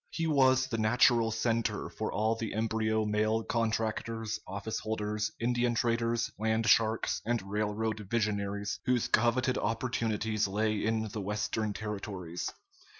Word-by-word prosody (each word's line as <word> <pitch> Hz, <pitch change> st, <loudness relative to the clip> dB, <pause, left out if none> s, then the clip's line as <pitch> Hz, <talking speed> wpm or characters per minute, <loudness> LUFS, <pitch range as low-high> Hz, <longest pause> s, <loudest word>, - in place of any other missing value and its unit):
He 165 Hz, -, -2 dB
was 130 Hz, -4 st, +4 dB
the 115 Hz, -4 st, -3 dB
natural 115 Hz, +1 st, +4 dB
center 115 Hz, 0 st, 0 dB
for -, -, -4 dB
all 110 Hz, +2 st, +1 dB
the 115 Hz, -2 st, -4 dB
embryo 110 Hz, 0 st, +1 dB
mail 110 Hz, +1 st, +1 dB
contractors, 115 Hz, -1 st, -1 dB
office 100 Hz, +3 st, -4 dB
holders, 105 Hz, -1 st, -2 dB
Indian 120 Hz, 0 st, +1 dB
traders, 115 Hz, 0 st, +1 dB
land 110 Hz, +1 st, +1 dB
sharks, 110 Hz, +1 st, +3 dB
and 120 Hz, +1 st, 0 dB
railroad 105 Hz, +2 st, -1 dB
visionaries 100 Hz, -2 st, -1 dB
whose 125 Hz, -2 st, +2 dB
coveted 125 Hz, +2 st, +2 dB
opportunities 110 Hz, -2 st, 0 dB
lay 105 Hz, +2 st, 0 dB
in 110 Hz, 0 st, 0 dB
the 105 Hz, +1 st, -4 dB
Western 105 Hz, +2 st, -1 dB
territories. 100 Hz, -5 st, -4 dB
110 Hz, 130 wpm, -31 LUFS, 105-115 Hz, -, was